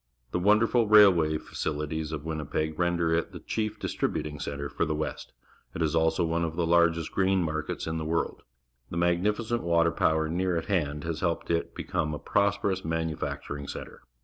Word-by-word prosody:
The - - 0
wonderful 110 +4 +4
railway 95 -8 +6
fa - - -15
cihties 75 +1 -2
of 75 -1 -5
Winnipeg 80 0 -3
render 85 -2 +1
it 85 - -1
the - - -7
chief 110 -1 -3
dis - - -4
tributing 75 -1 -2
centre 70 0 -4
for - - -2
the 75 - 0
West. 75 - -4 0.4
It 80 - 0
is 80 0 0
also 80 +1 +2
one 85 +1 0
of 80 -1 -2
the 85 -1 0
large 85 0 +4
st 80 -1 -4
g - - -27
rain 95 -2 +3
niarkets^in 80 +1 -3
the - - -3
world. 80 +1 -1 0.5
The 85 - -5
magnificent 105 +7 +1
water 85 -1 +3
power 80 0 +1
near 90 +2 0
at 80 - -3
hand 75 -7 -1
has 85 -2 -3
helped 85 -1 -1
it 85 0 0
to - - -32
become 75 -1 -2
a - - -4
prosperous 100 -1 0
manu 80 -1 -1
facturing 70 -1 -5
centre. - - -8
85 Hz, 200 wpm, -28 LUFS, 80-90 Hz, 0.5 s, railway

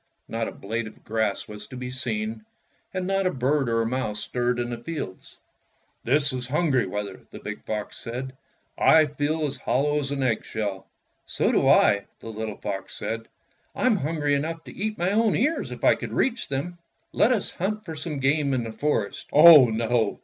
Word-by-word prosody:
Not 115 0 -2
a - - -4
blade 110 +3 -4
of 110 - -14
grass 110 0 -1
was 105 0 -9
to 130 - -9
be 125 0 -5
seen, 215 - -3 0.5
and 185 -1 -3
not 195 0 +1
a - - +1
bird 135 0 +1
or 115 0 +2
a - - -2
mouse 115 -3 -2
stirred 125 0 -1
in 120 0 -2
the 120 - -4
fields. 120 - -7 0.7
''This 140 +2 +2
is 125 -1 -2
hungry 140 - +1
weather," 100 0 -5
the - - -10
big - - -7
fox 105 -1 -4
said. 130 +3 -5 0.5
"I 160 -1 +6
feel 150 +2 -1
as 140 -1 -3
hollow 145 +3 +1
as 140 -2 -3
an 140 -1 -1
eggshell." 105 -5 -2 0.4
"So - - +1
do - - +2
I," 100 0 +5
the 115 - -9
little 110 -1 -5
fox 95 -2 -5
said. 115 0 -4 0.5
"I'm 250 -4 +3
hungry 150 -2 0
enough 160 +3 -2
to - - -11
eat 215 +2 -3
my 175 +2 +1
own 220 0 +3
ears 300 +8 0
if - - -8
I - - +6
could - - -6
reach 255 -2 0
them. 170 +6 -4 0.3
Let 240 - +3
us 225 -6 0
hunt 210 +4 -3
for 165 - -6
game 145 -2 0
in 125 - -1
the 115 - -5
forest." 115 -7 -1
"Oh, 150 -2 +10
no!" 115 +1 0
135 Hz, 195 wpm, -25 LUFS, 115-165 Hz, 0.7 s, Oh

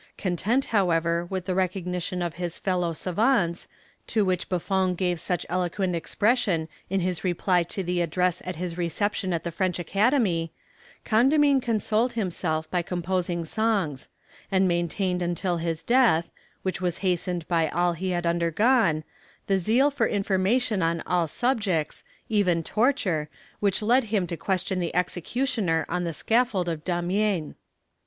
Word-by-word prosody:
Content, 210 +8 0
however, 170 -4 +2
with 185 -2 -3
the 185 - -1
recognition 180 -1 -1
of 170 -2 -3
his 175 -1 -4
fellow 180 -3 0
savants, 180 +1 +1 0.4
to 215 -3 +1
which 185 -1 -1
Buffon 185 0 0
gave 180 -1 -1
such 180 0 -1
eloquent 180 +1 -1
expression 200 -2 +1 0.2
in 195 0 0
his 180 -2 -2
reply 180 0 +2
to 175 +3 -4
the 175 0 0
address 180 +2 0
at 185 - -4
his 175 +1 -5
reception 190 +3 -1
at 170 -2 -1
the 170 - -3
French 185 +2 -1
Academy, 195 - +1 0.5
Condamine 275 +4 +4
consoled 225 +1 0
himself 165 -7 -2
by 180 - +1
composing 175 -1 -2
songs; 195 -8 -1 0.4
and 190 0 +3
maintained 180 +1 0
until 175 +1 -1
his 165 -1 -3
death, 235 -9 +3 0.3
which 185 0 -2
was 175 -2 0
hastened 180 -2 -1
by 165 -3 +2
all 175 +2 +1
he 185 +3 -3
had 175 -1 -1
undergone, 170 +1 +2 0.4
the 195 -1 +2
zeal 245 +10 +3
for 270 -5 +1
information 200 +2 +1
on 165 0 0
all 175 -2 +1
subjects, 200 - -1 0.2
even 190 -7 +2
torture, 195 - +1 0.3
which 200 0 +1
led 245 +4 +3
him 205 -4 0
to 170 - -4
question 190 +1 -1
the 170 -1 -3
executioner 180 - 0
on 180 +1 -2
the 170 - -1
scaffold 220 - +1
of 160 -3 -3
Damiens." 180 -1 0
180 Hz, 145 wpm, -26 LUFS, 170-205 Hz, 0.5 s, Condamine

